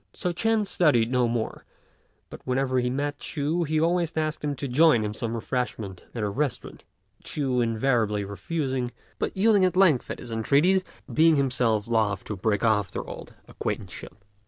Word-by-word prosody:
So 180 -2 -2
Ch'ên 225 +3 +1
studied 140 - +2
no 125 -2 +3
more, 115 -1 -3 0.7
but - - -9
whenever 130 0 0
he 125 0 0
met 145 +3 -2
Ch'u 155 +4 -1
he 155 +1 +1
always 170 0 +1
asked 155 -1 -1
him 145 -1 -1
to 140 - -4
join 135 -2 +4
in 105 0 -3
some 115 +1 -3
refreshment 115 -5 -4
at 115 - -2
a - - +1
restaurant, 140 +4 -3 0.4
Ch'u 130 -4 -1
invariably 115 -3 +1
refusing, 130 +4 -2 0.3
but - - -2
yielding 205 -1 +4
at 185 0 +2
length 170 -10 +4
to - - -4
his 120 - -9
entreaties, 145 - +3 0.3
being 160 0 +5
himself 125 -6 +1
loth 110 -4 +1
to 105 - -5
break 105 +2 0
off 105 -4 +2
their - - -5
old - - -9
acquaintanceship. - - -5
130 Hz, 170 wpm, -26 LUFS, 115-155 Hz, 0.7 s, being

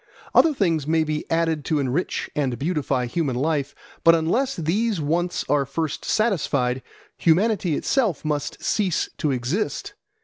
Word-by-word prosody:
Other 325 - +6
things 165 - 0
may 160 0 +3
be 155 -1 -3
added 165 -2 +1
to 155 - +1
enrich 140 +5 -1
and 135 -5 0
beautify 140 -4 -1
human 135 0 -1
life, 140 +1 -1 0.3
but 165 0 +7
unless 235 +12 0
these 195 +5 0
wants 175 +4 -1
are 145 -1 +2
first 155 +2 -3
satisfied, 140 - +1 0.4
humanity 180 -1 +2
itself 220 - 0
must 145 -1 -3
cease 195 -6 0
to 150 - +1
exist. 150 - -2
160 Hz, 140 wpm, -23 LUFS, 145-180 Hz, 0.4 s, but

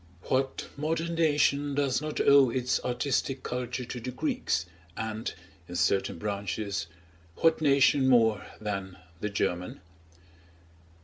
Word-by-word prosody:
What 135 +1 0
modern 165 +3 -1
nation 145 -3 +2
does 140 -2 +1
not 155 0 -4
owe 140 -2 +6
its 125 +1 0
artistic 130 +1 -1
culture 125 0 -3
to 125 +1 -6
the 125 +2 -5
Greeks, 120 -8 -1 0.3
and, 110 +1 -3 0.4
in 90 - -7
certain 95 +1 +1
branches, 100 -1 -3 0.5
what 165 -1 +3
nation 140 -2 +4
more 115 -5 +4 0.2
than 100 -3 -4 0.2
the 105 - -2
German? 90 -3 -2
125 Hz, 120 wpm, -28 LUFS, 105-140 Hz, 0.5 s, owe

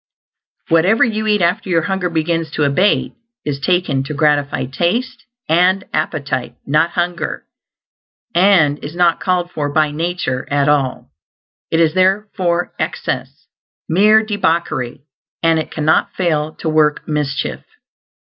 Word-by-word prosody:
Whatever 180 +7 +4
you 220 -2 -1
eat 210 -3 +2
after 185 +4 0
your 165 -3 +2
hunger 190 -1 -1
begins 165 0 -1
to 150 - 0
abate 180 +9 +2 0.3
is 140 -2 -2
taken 175 -3 +1
to 150 - -5
gratify 145 -2 +1
taste 225 - -2 0.2
and 180 +4 +3
appetite, 140 -5 -2
not 155 +4 +2
hunger 175 0 -2 0.9
and 175 -6 +3
is 150 +3 -7
not 175 -1 +3
called 180 -2 -1
for 145 -2 -3
by 155 0 +2
nature 160 -5 -3
at 140 0 +1
all. 135 - 0 0.6
It 165 - +1
is 160 -2 +3
therefore 185 -2 0
excess; - - -4 0.4
mere 210 +6 +4
debauchery, 170 - -1 0.4
and 165 -1 +3
it 155 - -4
cannot 155 0 +1
fail 155 -4 -1
to - - -6
work 155 -1 +2
mischief. 150 -3 -2
165 Hz, 130 wpm, -17 LUFS, 150-185 Hz, 0.9 s, Whatever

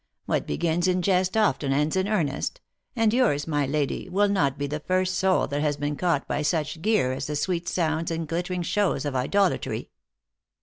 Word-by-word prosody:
What - - -1
begins 170 - 0
in 180 -1 +1
jest 185 +1 +2
often 145 -10 +2
ends 150 +4 +1
in 190 +1 +1
earnest; 180 - -1 0.4
and 225 -2 +2
yours, 225 - +2
my 145 -3 0
lady, 145 +4 -2
will 200 +3 +2
not 145 -9 +1
be 145 - -2
the 150 +2 -3
first 185 +3 0
soul 190 0 +2
that 145 0 -1
has 150 -1 0
been 145 +1 -2
caught 170 -3 0
by 145 - -1
such 150 0 -1
gear 210 -11 +2
as 130 +1 -4
the 150 - -3
sweet 175 +3 -1
sounds 160 -1 0
and 165 -1 -3
glittering 175 +2 -2
shows 200 -3 0
of 145 -2 -2
idolatry." 185 +9 0
165 Hz, 190 wpm, -25 LUFS, 145-185 Hz, 0.4 s, jest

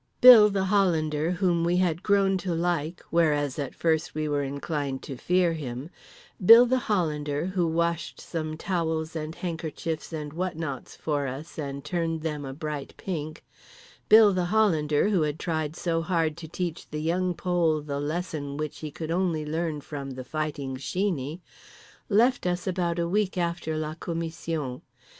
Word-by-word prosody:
Bill 235 -4 +10
the 195 -1 0
Hollander, 165 -6 +2
whom 175 -2 +1
we 175 +1 +2
had 175 -2 +1
grown 195 -1 +3
to 180 -2 -2
like, 170 -1 -1
whereas 150 -4 +2
at 140 -3 -4
first 160 -2 0
we 155 0 -1
were 145 -1 0
inclined 140 -1 -3
to 135 - -6
fear 180 +5 +2
him, 140 0 -6 0.5
Bill 230 +6 +10
the 255 +1 +2
Hollander 150 -6 0
who 185 -2 0
washed 165 -5 -1
some 155 -2 -4
towels 160 -3 -2
and 155 0 -4
handkerchiefs 165 -2 -4
and 150 -2 -5
what 180 0 -3
nots 145 -5 -5
for 145 -3 -1
us 140 +6 -7
and 140 -2 -5
turned 165 -3 -1
them 150 -3 -3
a 135 - -5
bright 150 -2 -5
pink, 155 -4 -5 0.6
Bill 215 -2 +8
the 180 -1 0
Hollander 175 -5 +2
who 190 -5 +2
had 150 0 0
tried 160 -2 -2
so 165 -2 -1
hard 165 -3 0
to 165 -2 -8
teach 175 0 -4
The 150 - -4
Young 180 +2 0
Pole 170 -3 +1
the 140 -1 -4
lesson 150 -2 -3
which 155 -1 -4
he 155 - -5
could 160 +2 -6
only 170 -3 0
learn 160 -1 -2
from 140 -1 -6
The 130 -1 -6
Fighting 145 -2 -3
Sheeney, 165 0 -2 0.7
left 230 0 +3
us 180 0 -1
about 175 -3 -1
a 170 0 0
week 195 +1 0
after 170 -2 -1
la 155 0 -3
commission. 165 -5 -4
160 Hz, 165 wpm, -27 LUFS, 150-180 Hz, 0.7 s, Bill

